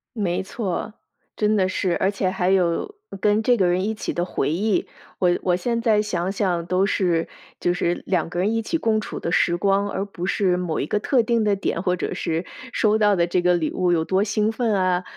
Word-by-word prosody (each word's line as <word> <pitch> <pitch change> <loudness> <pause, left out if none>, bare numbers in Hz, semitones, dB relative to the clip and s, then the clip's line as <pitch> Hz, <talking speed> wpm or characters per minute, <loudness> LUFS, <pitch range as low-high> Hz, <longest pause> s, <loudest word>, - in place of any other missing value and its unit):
没 190 -4 -1
错， 195 +1 -4 0.4
真 210 0 +1
的 190 -2 +2
是， 185 -2 0
而 190 - +1
且 195 -2 -1
还 185 -1 0
有 185 - +1 0.3
跟 210 +1 +3
这 245 +2 +4
个 190 -6 +2
人 180 +1 +1
一 215 +2 -1
起 215 - -4
的 175 - -1
回 145 -5 -1
忆， 200 +5 0 0.3
我 180 - +3
我 180 -1 +2
现 235 +6 -1
在 220 -3 +3
想 190 -3 -2
想 180 -4 -1
都 185 +2 +1
是， 175 -5 +1 0.3
就 175 - +1
是 175 0 -1
两 180 -4 0
个 175 - -4
人 195 +4 +1
一 225 - 0
起 330 - -1
共 225 -7 +1
处 - - -6
的 170 - -3
时 175 - +2
光， 200 +2 +1
而 195 - -2
不 180 -3 -6
是 185 -1 +1
某 180 -3 -2
一 145 - -2
个 210 - 0
特 255 +3 +2
定 230 0 +1
的 205 -1 +2
点， 185 -3 -2
或 180 -1 +1
者 - - -3
是 165 +2 -2 0.3
收 215 0 +3
到 210 -2 +3
的 170 -2 +2
这 175 +1 +1
个 180 0 +3
礼 165 -3 -1
物 180 -1 +1
有 165 -2 +2
多 190 +4 +1
兴 210 +1 0
奋 225 -1 0
啊， 185 -2 +1
190 Hz, 250 characters per minute, -23 LUFS, 175-210 Hz, 0.4 s, 这